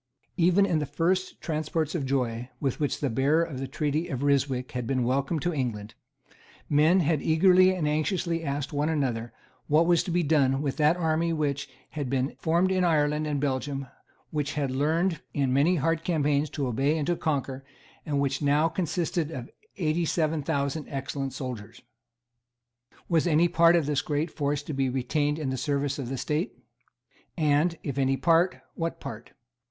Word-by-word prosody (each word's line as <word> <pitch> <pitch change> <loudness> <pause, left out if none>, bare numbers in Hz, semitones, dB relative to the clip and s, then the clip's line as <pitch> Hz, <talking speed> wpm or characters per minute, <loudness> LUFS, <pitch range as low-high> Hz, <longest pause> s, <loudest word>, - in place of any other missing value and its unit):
Even 185 +2 +4
in 170 -5 +1
the 150 - -3
first 180 +6 -1
transports 155 -1 -2
of 145 -7 -2
joy 125 -3 -1
with 135 -4 -2
which 145 -2 -1
the 145 - +1
bearer 140 +7 +2
of 145 -6 -5
the 135 - -3
treaty 150 +4 -1
of 135 0 -4
Ryswick 135 -3 +1
had 125 -2 -4
been 130 -2 0
welcomed 135 +5 0
to 175 - 0
England, 110 -7 -3 0.7
men 155 +5 +4
had 155 -2 +1
eagerly 185 +3 +5
and 160 -5 -1
anxiously 165 +2 0
asked 140 -1 -3
one 145 +2 0
another 125 -7 -1 0.4
what 155 +3 +4
was 170 -1 +4
to - - -5
be 175 0 +1
done 140 -3 +2
with 140 -2 -2
that 155 +2 +3
army 165 0 +1
which 145 -3 -2 0.2
had 145 -4 -4
been 135 +1 -1
formed 170 +3 +2
in 185 -1 +2
Ireland 150 -2 +2
and 145 -2 -1
Belgium, 135 0 -2 0.5
which 150 -2 -2
had 140 -3 -1
learned, 160 +5 0
in 135 -3 +1
many 150 +7 +3
hard 165 +1 0
campaigns, 150 -3 +1
to 140 - -3
obey 135 +6 +1
and 150 - -1
to 175 - +1
conquer, 135 -4 -2 0.4
and 145 0 -1
which 135 -1 0
now 145 +2 +3
consisted 165 -2 -1
of 125 -6 -7 0.3
eighty 165 -1 0
seven 160 -1 0
thousand 140 +2 -2
excellent 135 -1 -4
soldiers. 125 -6 -6 1.3
Was 165 0 +2
any 165 +1 +4
part 170 0 +5
of 165 -4 +2
this 145 -1 0
great 155 +2 -2
force 145 0 -1
to 150 - -5
be 135 -1 0
retained 145 +4 0
in 145 -4 -2
the 130 - -2
service 140 +1 -1
of 125 -3 -4
the 135 - -3
State? 155 - -2 0.8
And, 155 +2 +2
if 140 -1 -3
any 135 0 +2
part, 165 +5 +2
what 165 -1 -3
part? 110 - -8
150 Hz, 180 wpm, -27 LUFS, 135-165 Hz, 1.3 s, eagerly